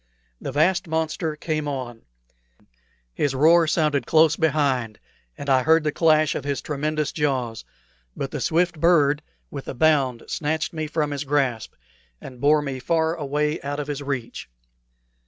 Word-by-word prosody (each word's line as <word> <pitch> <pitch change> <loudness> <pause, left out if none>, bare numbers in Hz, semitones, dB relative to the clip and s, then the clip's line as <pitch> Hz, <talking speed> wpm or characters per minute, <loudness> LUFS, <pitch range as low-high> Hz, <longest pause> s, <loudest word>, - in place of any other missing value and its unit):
The - - -4
vast 175 +6 +2
monster 160 0 -2
came 155 -1 -3
on. 125 -5 -5 1.1
His 140 - -1
roar 165 +4 +5
sounded 150 -5 +1
close 155 -1 +4
behind, 135 -8 0 0.4
and 140 - -7
I 130 -2 +4
heard 160 +3 +4
the 150 - 0
clash 155 -1 +3
of - - -4
his 140 -1 -2
tremendous 150 0 -2
jaws; 130 -7 -2 0.5
but 135 - -4
the 150 - -4
swift 170 +1 +1
bird 150 -3 +3 0.3
with 140 -2 -7
a - - -5
bound 135 -4 +2
snatched 155 +1 -2
me 155 -1 -3
from 150 -1 -1
his 145 0 -3
grasp, 135 -6 -1 0.4
and 125 -3 -11
bore 150 +1 +4
me 135 -2 -4
far 160 +4 +1
away 150 0 -2
out 145 +1 -4
of 145 - -3
his 145 -1 -4
reach. 135 - -5
150 Hz, 155 wpm, -23 LUFS, 135-155 Hz, 1.1 s, roar